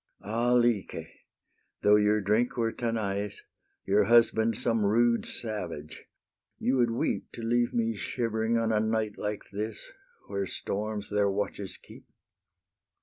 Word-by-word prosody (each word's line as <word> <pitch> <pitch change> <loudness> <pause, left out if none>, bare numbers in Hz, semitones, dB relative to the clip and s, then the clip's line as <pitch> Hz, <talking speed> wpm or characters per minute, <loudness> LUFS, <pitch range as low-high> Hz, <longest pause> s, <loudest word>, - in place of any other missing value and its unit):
Ah 115 +4 +1
Lyce! 120 -9 +1 0.8
though 105 0 +6
your 105 0 +3
drink 110 +6 +1
were 115 -1 +1
Tanais, 105 -4 -2 0.5
Your 100 +1 +3
husband 115 -1 +4
some 115 -2 +1
rude 115 +3 +3
savage, 90 -9 -5 0.5
you 130 +1 +1
would 120 -2 +3
weep 115 - -1
To 115 - -7
leave 120 +1 +2
me 115 -1 0
shivering, 115 +1 -1
on 115 -1 +1
a 110 - +3
night 110 -1 -1
like 105 0 -3
this, 105 +2 -5 0.3
Where 100 -1 -3
storms 105 +2 -4
their 100 -1 +2
watches 100 0 -3
keep. - - -15
110 Hz, 135 wpm, -29 LUFS, 105-115 Hz, 0.8 s, though